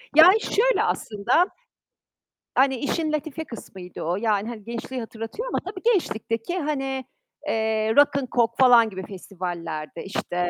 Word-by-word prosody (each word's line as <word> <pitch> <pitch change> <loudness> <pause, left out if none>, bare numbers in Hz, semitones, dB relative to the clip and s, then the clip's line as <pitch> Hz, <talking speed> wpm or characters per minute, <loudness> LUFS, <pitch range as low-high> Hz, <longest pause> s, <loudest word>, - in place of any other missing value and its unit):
Yani, 365 +8 +8
şöyle - - +2
aslında, 235 - +1 1.1
hani 265 0 +4
işin 310 +4 -1
latife 305 +1 -3
kısmıydı 190 - -9
o. 170 +2 0
Yani, 210 +1 0
hani 225 -3 -8
gençliği 235 +3 -5
hatırlatıyor 225 - -6
ama - - -1
tabii 375 0 -7
gençlikteki 230 - -2
hani, 270 -4 -2 0.4
eee, 220 0 +1
Rock'n 280 -2 +4
Coke 235 -1 +3
falan 240 -3 +7
gibi 190 -2 -7
festivallerde, 175 -5 -6
işte 180 -2 -2
235 Hz, 130 wpm, -24 LUFS, 205-290 Hz, 1.1 s, Yani